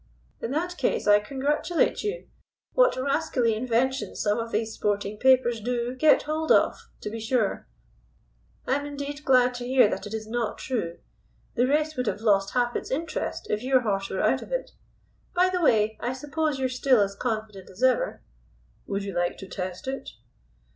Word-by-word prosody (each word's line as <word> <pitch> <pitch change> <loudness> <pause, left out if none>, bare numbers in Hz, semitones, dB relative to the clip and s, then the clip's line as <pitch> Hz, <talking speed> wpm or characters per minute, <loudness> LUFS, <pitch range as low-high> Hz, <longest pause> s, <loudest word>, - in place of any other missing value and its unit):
"In - - -3
that 350 +6 -2
case - - 0
I 205 0 +6
congratulate 285 +8 0
you. 425 +4 -4 0.5
What - - +4
rascally 260 -3 +1
inventions 255 +4 -1
some 210 +2 +1
of 230 0 -4
these 220 +1 -1
sporting 205 0 -2
papers 255 -3 +4
do 240 +1 -2
get 300 +4 +4
hold 315 +1 -1
of, - - +5 0.3
to 210 - -5
be 225 - -5
sure. 225 -1 0 1.0
I'm 285 +2 0
indeed 285 0 -6
glad 250 -2 +4
to 245 0 -6
hear 255 -3 +5
that - - -4
it 205 - -8
is 220 0 -5
not 230 0 -2
true. 195 -10 -3 0.6
The 245 +1 +2
race 305 +2 +1
would 250 -2 -1
have 210 - -2
lost 200 -2 +2
half 240 -1 +1
its - - -3
interest 320 +5 -3
if 210 - 0
your 260 0 +3
horse 195 -4 -1
were - - -2
out - - +2
of - - -11
it. - - -2 0.6
By 365 +1 +4
the 365 -1 -1
way, 220 -7 +3
I 245 +2 -1
suppose 295 +2 -2
you 265 - -1
are - - +1
still 255 -1 +3
as 200 -1 0
confident 215 -4 -4
as 190 +7 -8
ever?" 255 -1 +2 0.6
"Would 200 0 -2
you 200 -1 -5
like 175 0 -1
to 195 - -9
test 185 +3 -6
it?" 270 +1 -4
250 Hz, 185 wpm, -26 LUFS, 215-280 Hz, 1.0 s, I